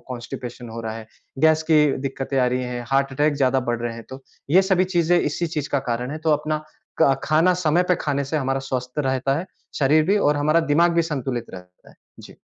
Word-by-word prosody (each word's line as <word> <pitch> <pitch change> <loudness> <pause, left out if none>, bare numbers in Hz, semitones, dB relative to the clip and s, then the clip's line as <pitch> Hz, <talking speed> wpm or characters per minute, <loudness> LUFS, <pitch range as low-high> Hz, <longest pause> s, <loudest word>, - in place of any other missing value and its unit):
Constipation 120 0 -7
हो 115 +1 -6
रहा 110 -1 -4
है, 110 -1 -9 0.3
गैस 160 +2 +4
की 150 -1 +6 0.2
दिक्कतें 135 0 -3
आ 125 - +3
रही 125 +1 -1
हैं, 125 -1 -5
हार्ट 135 0 +1
अटैक 145 +2 +1
ज़्यादा 130 -1 +2
बढ 120 -1 -2
रहे 120 -1 -3
हैं। 115 - -9
तो 130 +1 -9 0.3
ये 185 +5 +6
सभी 190 -1 +2
चीज़ें 175 +1 +3
इसी 160 +4 -1
चीज़ 150 -3 -4
का 140 - +1
कारण 125 +3 -2
हैं 155 - -5
तो 160 - +3
अपना 155 +1 -1 0.4
क 135 -3 +3
खाना 160 +4 +3
समय 175 -1 +2
पे 180 - +4
खाने 140 -2 -1
से 155 +3 -3
हमारा 135 -1 -1
स्वस्थ 130 0 -5
रहता 135 0 0
है, 180 - -5 0.3
शरीर 150 +2 +4
भी 200 +3 +3
और 150 -6 +2
हमारा 155 +3 +2
दिमाग 170 +3 +4
भी 170 - +3
संतुलित 135 -7 -3
रहता 90 0 -14
है। - - -21 0.3
जी। - - -13
140 Hz, 225 wpm, -22 LUFS, 125-155 Hz, 0.4 s, की